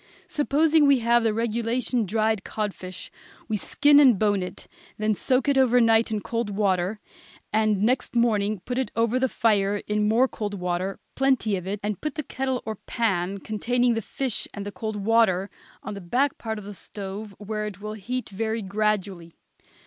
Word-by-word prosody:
Supposing 305 -1 +3
we 280 -1 +6
have 235 +1 +4
the 225 -1 +2
regulation 230 +1 -1
dried 220 0 +1
codfish, 190 -4 -5 0.4
we 220 - -1
skin 290 +8 +4
and 260 -7 +6
bone 205 -1 +2
it, 180 - -7 0.3
then 215 0 +1
soak 255 +8 +1
it 280 -1 +3
over 250 -1 +5
night 225 -1 +4
in 215 -1 -2
cold 230 0 -2
water, 195 0 0 0.5
and 215 -2 +2
next 250 +2 0
morning 215 -4 +2
put 250 +1 -2
it 265 - -1
over 230 +2 +2
the 260 0 +1
fire 205 -3 +2
in 210 0 +1
more 235 +5 +4
cold 205 -4 -4
water, 180 +1 -2
plenty 260 -6 +2
of 180 -1 -5
it, 200 +1 -3
and 210 -1 -3
put 305 -2 -3
the 305 - -3
kettle 260 -1 -2
or 220 -1 -4
pan 195 -5 -1
containing 240 +3 +1
the 225 - -1
fish 260 +2 -3
and 200 - -5
the 205 - -5
cold 215 +1 -4
water 205 -2 +2 0.3
on 210 - -5
the 200 - -7
back 255 +11 0
part 220 -1 -4
of 210 - -7
the 205 - -7
stove, 200 +1 -7
where 210 0 -4
it 200 -3 -8
will 215 +1 -5
heat 245 +5 -4
very 220 +2 -2
gradually. 195 -4 -2
215 Hz, 185 wpm, -25 LUFS, 200-240 Hz, 0.5 s, we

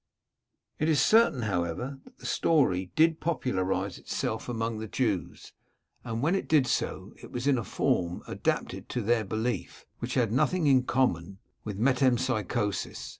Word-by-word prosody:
It 155 - +1
is 155 -4 +3
certain, 185 - +4
however, 105 +7 -2
that - - -18
the - - -13
story 95 - +2
did 160 0 +4
popularise 95 - -1
itself - - -3
among 115 -2 -2
the 110 - -5
Jews, - - -2 0.5
and 115 0 -3
when 165 +5 +3
it 195 - -1
did 150 -4 +4
so, - - -2
it - - -11
was 125 +1 -4
in 140 -3 +3
a - - -3
form 90 -4 -1
adapted - - -2
to 125 - -2
their 115 +1 +2
belief, 110 +4 -3
which 120 +1 -4
had 120 -5 +2
nothing 165 +7 +2
in 130 -3 +4
common 100 -9 0 0.3
with 105 -3 -5
metempsychosis. 120 -4 0
120 Hz, 155 wpm, -28 LUFS, 105-135 Hz, 0.5 s, certain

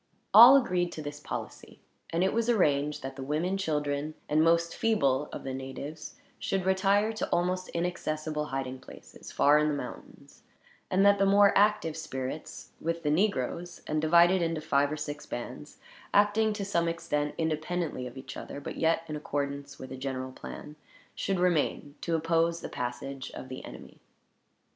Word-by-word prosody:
All 240 +6 +11
agreed 180 -9 0
to 155 - -6
this 145 0 -6
policy; - - -7 0.3
and 170 +2 0
it 190 - +1
was 230 +1 0
arranged 150 - +2
that 135 0 -6
the 135 - -7
women, 155 +7 -1
children, 150 -4 -2
and 155 +1 +3
most 170 0 +2
feeble 150 -11 +1
of - - -7
the 135 - -4
natives 135 +4 -7 0.2
should 190 -2 -1
retire 200 +3 +2
to 215 - -3
almost 185 +1 0
inaccessible 155 -3 -2
hiding 135 -2 -4
places, - - -13
far 145 +1 +5
in 150 - +2
the 150 - 0
mountains; 125 -3 -9 0.5
and 195 +2 +3
that 200 0 +5
the 195 - +4
more 200 0 +5
active 205 -6 +3
spirits, 150 -2 -6
with 165 +1 -2
the 150 - +1
negroes, 175 -1 -1
and 155 0 -1
divided 170 +3 +5
into 165 -1 0
five 145 -1 +1
or 155 - -3
six 150 0 -6
bands, 125 +5 -7 0.4
acting 210 +2 +4
to 205 -1 -4
some 170 -4 +1
extent 150 -3 -2
independently 160 -3 -2
of 125 +2 -11
each 130 - -8
other, - - -7
but 145 - -7
yet 165 0 +2
in 155 - -4
accordance 140 -1 -4
with 130 - -9
a 130 - -6
general 130 -1 -4
plan, 150 +3 -9 0.4
should 195 -2 -1
remain 165 -4 +1
to 170 - 0
oppose 165 +1 +1
the - - -6
passage 130 +2 -5
of 130 - -8
the 130 - -7
enemy. - - -11
155 Hz, 170 wpm, -29 LUFS, 145-180 Hz, 0.5 s, All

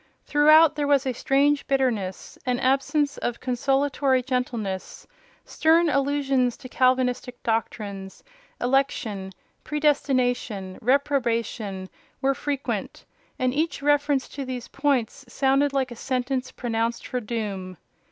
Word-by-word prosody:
Throughout 305 +2 +6
there 295 -1 -1
was 285 -1 +3
a 260 - 0
strange 280 +3 +2
bitterness; 240 -9 -1
an 250 -1 0
absence 280 +2 +1
of 240 -1 -3
consolatory 270 +1 +1
gentleness; 240 -7 -3 0.4
stern 325 +1 +3
allusions 275 -3 +1
to 255 - -10
Calvinistic 255 -1 +1
doctrines—election, 225 - -3 0.3
predestination, 255 -10 0
reprobation—were 235 -3 -1
frequent; 280 0 -4 0.3
and 255 0 0
each 310 0 -1
reference 290 -2 +2
to 280 - -6
these 255 -2 -6
points 275 -4 0
sounded 275 +2 +2
like 265 -2 -1
a - - -6
sentence 255 +1 -2
pronounced 230 -1 -2
for 250 - -2
doom. 205 -5 -4
260 Hz, 105 wpm, -25 LUFS, 235-280 Hz, 0.4 s, Throughout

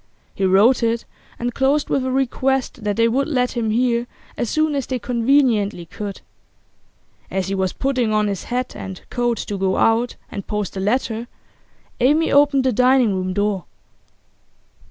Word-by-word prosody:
He 195 - -1
wrote 200 +8 +4
it, 230 0 0 0.3
and 240 0 -3
closed 280 +3 +1
with 270 - +1
a 260 - -1
request 265 -1 -1
that 205 -1 0
they 230 +2 +3
would 265 +4 +1
let 250 -5 0
him 235 -3 -2
hear 240 +1 +1 0.3
as 240 - -2
soon 310 -1 +1
as 275 -3 -2
they 260 - -1
conveniently 235 -6 +1
could. 200 +3 -7 1.1
As 190 -1 -2
he - - -1
was 190 -1 0
putting 255 -5 0
on 215 0 +2
his 200 -3 -3
hat 250 +1 -3
and 190 -2 -7
coat 240 -1 0
to 205 0 -4
go 190 -1 +1
out 230 +2 +2 0.2
and 200 -2 -6
post 210 -3 -3
the 195 - -5
letter 225 +2 -1 0.7
Amy 295 +6 +3
opened 285 -1 +4
the 260 -1 +1
dining 250 -1 +4
room 185 0 -2
door. 205 -3 -1
235 Hz, 170 wpm, -21 LUFS, 205-260 Hz, 1.1 s, wrote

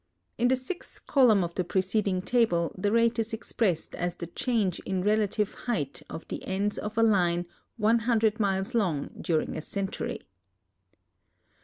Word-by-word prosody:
In 245 - +4
the 260 - +4
sixth 260 +8 -7
column 235 -9 +5
of 170 0 -4
the 185 - 0
preceding 190 +1 0
table 190 -9 +2
the 205 +2 0
rate 230 +1 +3
is 225 0 -2
cxi>rest 210 -6 -1
as 175 0 -2
the 175 - -6
ciiange 200 +1 0
in 185 -1 -1
relative 210 0 +1
height 180 - -3
of 160 - -7
the - - -5
ends 200 +2 -1
of 210 +2 -5
a 225 - +5
line 175 -5 +3 0.3
100 225 0 +2
miles 195 0 0
lon^ 185 - -1
during 160 -2 0
a - - -3
centurv. 195 +4 -4
205 Hz, 155 wpm, -28 LUFS, 180-225 Hz, 0.3 s, column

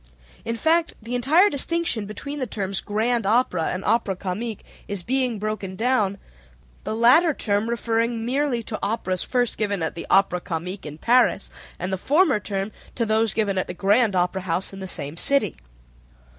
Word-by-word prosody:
In 230 - -2
fact 325 +7 +1
the 230 +2 -7
entire 295 - +4
distinction 290 - -1
between 280 +8 -6
the 255 - -2
terms 195 -2 -2
grand 225 +1 0
opera 210 -7 +2
and 185 +1 -3
opera 225 -4 +1
comique 200 +4 -4 0.2
is 200 -3 -3
being 255 0 0
broken 205 -2 -4
down, 215 -3 +1 0.7
the - - -2
latter 275 +8 +5
term 205 +1 0
referring 230 0 0
merely 255 -1 0
to 215 - -5
operas 195 -3 -1
first 245 -2 -1
given 200 -5 0
at 160 - -2
the 170 - -7
Opera 190 -2 +3
Comique 175 +2 -4
in 150 0 -8
Paris, 245 +9 +2 0.3
and 185 +1 -3
the 190 - -2
former 295 - +3
term 195 0 -3 0.2
to 235 - 0
those 220 -1 +1
given 200 -4 +1
at - - -2
the - - -6
Grand 205 +3 +3
Opera 180 +1 +1
House 180 +2 -2
in 195 - -8
the 190 - -5
same 150 -3 -3
city. 280 +9 +2
215 Hz, 175 wpm, -24 LUFS, 190-245 Hz, 0.7 s, latter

